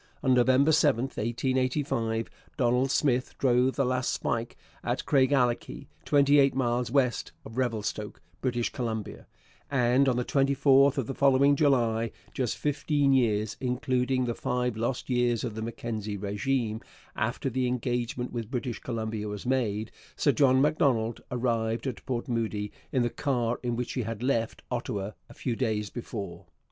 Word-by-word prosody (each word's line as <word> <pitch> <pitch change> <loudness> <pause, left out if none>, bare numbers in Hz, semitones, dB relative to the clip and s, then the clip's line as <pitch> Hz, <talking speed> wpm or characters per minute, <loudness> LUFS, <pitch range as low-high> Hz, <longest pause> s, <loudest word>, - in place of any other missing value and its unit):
On 130 -2 +4
November 130 +4 +4
7, 140 -6 +3
1885, 130 -1 -1 0.3
Donald 125 +1 +2
Smith 130 -2 +1
drove 125 0 +3
the 140 - +1
last 125 0 0
spike 115 +1 -2 0.3
at - - -2
Craigellachie, 130 -3 +1 0.2
twenty 145 0 +5
eight 135 -2 +4
miles 125 -2 0
west 125 -2 +1
of 110 - -10
Revelstoke, 110 -4 -2 0.2
British 120 -2 -1
Columbia; 115 -4 -4 0.4
and 130 0 +3
on 125 - +1
the 125 - 0
24th 140 0 +4
of 135 - 0
the 135 - -4
following 140 +1 +4
July, 120 -6 +2 0.2
just 130 -5 -1
fifteen 145 -1 +1
years 110 -4 +2
(including 130 0 0
the 120 - -1
five 125 0 -1
lost 120 +3 -2
years 120 -2 +1
of 120 -4 -3
the 110 - -5
Mackenzie 110 -2 -4
régime) 110 +3 -1 0.3
after - - -1
the 130 0 0
engagement 125 0 -2
with 115 -3 -4
British 125 -2 -3
Columbia 110 -3 -3
was 105 +1 -6
made, 110 -5 0 0.2
Sir - - +3
John 130 -2 +4
Macdonald 135 -6 +2
arrived 115 -2 -1
at 130 -4 -4
Port 120 -2 -2
Moody 110 -3 -2 0.2
in 130 - +2
the 120 - 0
car 125 -4 -1
in 120 -1 -1
which 125 +1 -3
he 130 - -1
had 115 0 -5
left 115 -4 -1
Ottawa 105 -5 -3 0.2
a - - -13
few 120 -3 -2
days 110 -5 -1
before. 100 -7 -6
125 Hz, 155 wpm, -28 LUFS, 115-130 Hz, 0.4 s, twenty